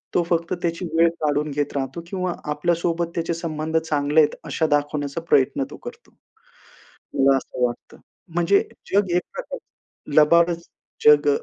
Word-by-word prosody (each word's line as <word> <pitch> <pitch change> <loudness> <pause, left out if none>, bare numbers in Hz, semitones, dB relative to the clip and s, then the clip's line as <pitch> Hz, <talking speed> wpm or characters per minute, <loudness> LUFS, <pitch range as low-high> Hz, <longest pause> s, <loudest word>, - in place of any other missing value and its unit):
तो 175 - +4
फक्त 170 0 0
त्याची 170 +1 -1
वेळ 165 +1 +5
काढून 150 0 0
घेत 145 0 -2
राहतो 135 +4 -3
किंवा 185 -1 -2 0.2
आपल्या 160 +4 +1
सोबत 170 0 -1
त्याचे 170 0 -1
संबंध 160 -1 -2
चांगले 150 -1 +1
आहेत, 150 - +1
अशा 160 - 0
दाखवण्याचा 145 +1 -2
प्रयत्न 135 - +3
तो - - -9
करतो. 475 0 -11 1.0
मला 135 0 +5
असं 125 - -4
वाटतं, 120 -1 -6 0.4
म्हणजे 175 +3 +3 0.3
जग 195 -3 +3
एक 180 - +3
प्रकारचं - - -10
लबाडच 170 +2 +5 0.4
जग 145 -1 +7
165 Hz, 145 wpm, -23 LUFS, 145-170 Hz, 1.0 s, जग